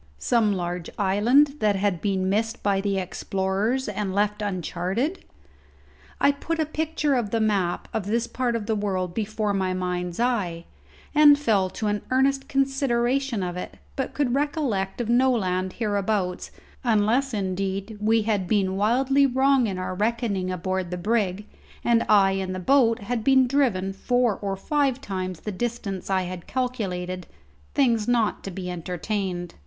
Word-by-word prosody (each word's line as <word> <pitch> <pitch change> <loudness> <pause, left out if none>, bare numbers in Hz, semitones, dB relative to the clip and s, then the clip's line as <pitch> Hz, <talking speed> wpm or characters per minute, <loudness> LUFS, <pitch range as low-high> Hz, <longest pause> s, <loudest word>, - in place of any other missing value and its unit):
Some 215 - +2
large 175 -2 -3
island 240 +9 +3
that 210 -3 +2
had 195 -3 0
been 190 -2 0
missed 225 +4 -1
by 195 -1 +2
the 200 -1 0
explorers 195 +6 -1
and 200 -2 -3
left 210 +1 +1
uncharted? 200 - -2 1.0
I 280 - +5
put 325 +4 -3
a 315 - +1
picture 310 -1 -1
of 240 -5 0
the 230 - 0
map 200 -5 0
of 210 -3 -2
this 230 +2 +1
part 245 -2 -1
of 225 -3 -3
the 220 0 0
world 190 -4 -2
before 215 0 -1
my 190 -1 0
mind's 180 0 -3
eye, 195 -9 0 0.5
and 295 -1 +7
fell 210 -10 +2
to 215 - -5
an 205 0 0
earnest 270 +1 +2
consideration 270 -3 +1
of 180 -1 -3
it, 180 - -6 0.2
but 265 - -3
could 275 -4 +1
recollect 270 - -1
of 235 - -3
no 250 +3 +4
land 185 -4 -1
hereabouts, 205 -4 -1 0.3
unless 235 +4 +2
indeed 195 +1 -3
we 220 +1 +3
had 205 -4 0
been 190 -2 +1
wildly 265 +6 +3
wrong 265 -1 +3
in 190 -3 -3
our 185 0 -3
reckoning 210 -2 -1
aboard 185 0 -2
the 180 - -4
brig, 205 0 0 0.4
and 235 -1 +3
I 200 -2 +6
in 190 -1 -2
the 185 - -4
boat 230 +2 +3
had 230 +1 -2
been 265 +1 +5
driven 240 -8 +1
four 245 +1 +1
or 195 -1 -2
five 275 +4 0
times 185 - -4
the 210 - -4
distance 200 -3 -4
I 190 -1 +2
had 180 -1 -7
calculated 185 -8 -3 0.5
things 235 -5 +2
not 235 -3 +1
to - - -3
be 185 0 -6
entertained. 180 +1 -3
210 Hz, 160 wpm, -25 LUFS, 190-245 Hz, 1.0 s, and